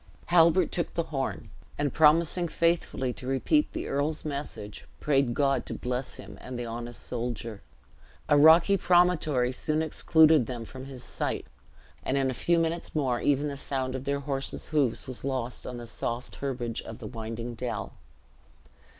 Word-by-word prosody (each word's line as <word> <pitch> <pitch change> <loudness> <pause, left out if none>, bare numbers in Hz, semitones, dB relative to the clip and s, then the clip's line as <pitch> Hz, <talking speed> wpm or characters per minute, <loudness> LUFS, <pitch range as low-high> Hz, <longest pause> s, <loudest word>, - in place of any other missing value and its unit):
Halbert 170 0 +5
took 170 - -2
the 170 - +1
horn, 135 -1 -3 0.3
and 145 -2 0
promising 165 +3 +4
faithfully 165 -7 0
to 125 - -9
repeat 215 - +2
the - - -4
earl's 150 +3 -1
message, 140 -8 -6
prayed 135 -5 +2
God 140 -1 +2
to - - -4
bless 125 +1 -3
him - - -10
and 125 -1 -6
the 120 - -3
honest 120 +1 -6
soldier. 115 -3 -4 0.7
A 150 - +5
rocky 165 +6 +7
promontory 170 -9 +3
soon 155 +4 0
excluded 160 -4 +4
them 120 -2 -5
from 130 +5 -9
his 130 -2 -9
sight, - - -3 0.6
and 135 - -1
in 135 -1 +2
a - - -3
few 170 +7 +2
minutes 165 0 -1
more 130 -5 +1
even 145 +1 +2
the 140 - -4
sound 130 -2 -3
of 130 0 -5
their 140 0 -1
horses' 135 -1 -4
hoofs 145 -7 +1
was 130 -2 -5
lost 130 -3 -3
on 125 - -5
the 120 - -7
soft 120 +2 -4
herbage 125 -4 -3
of 110 - -9
the - - -9
winding 115 +1 -5
dell. 120 +1 -4
135 Hz, 165 wpm, -28 LUFS, 125-155 Hz, 0.7 s, rocky